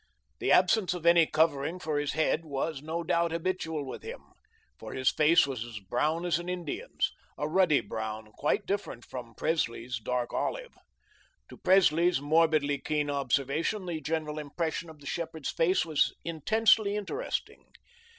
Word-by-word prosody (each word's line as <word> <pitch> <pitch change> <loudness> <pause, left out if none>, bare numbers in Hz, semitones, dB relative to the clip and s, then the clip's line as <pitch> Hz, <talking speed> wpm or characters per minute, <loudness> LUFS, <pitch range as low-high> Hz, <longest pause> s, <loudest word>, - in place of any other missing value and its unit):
The - - 0
absence 185 0 +4
of 170 -2 -7
any 170 -1 +6
covering 160 +1 +1
for 155 -4 -2
his 145 -1 -2
head 155 +1 +1
was, 145 -1 -3
no 160 +3 -3
doubt, 170 +1 +1
habitual 165 -3 -2
with 130 - -7
him, - - -10 0.5
for - - -8
his 130 0 +2
face 155 +1 +5
was 130 -5 -4
as 120 -2 -8
brown 150 - -1
as 175 -1 +1
an 175 +1 -6
Indian's 180 -4 -2 0.3
a 150 - -1
ruddy 165 -3 +3
brown 110 0 -5
quite 150 - 0
different 195 - -3
from 120 -3 -8
Presley's 125 -6 -1
dark 125 +2 -2
olive. - - -2 0.8
To - - -11
Presley's 175 -3 +4
morbidly 150 -1 +2
keen 150 0 -1
observation, 140 - 0
the 165 -3 -4
general 155 0 -2
impression 160 +3 -3
of 155 -2 -14
the - - -14
shepherd's 160 -1 -4
face 170 +1 +2
was 155 -3 +1
intensely 205 +5 +3
interesting. 315 - -4
160 Hz, 155 wpm, -29 LUFS, 140-170 Hz, 0.8 s, any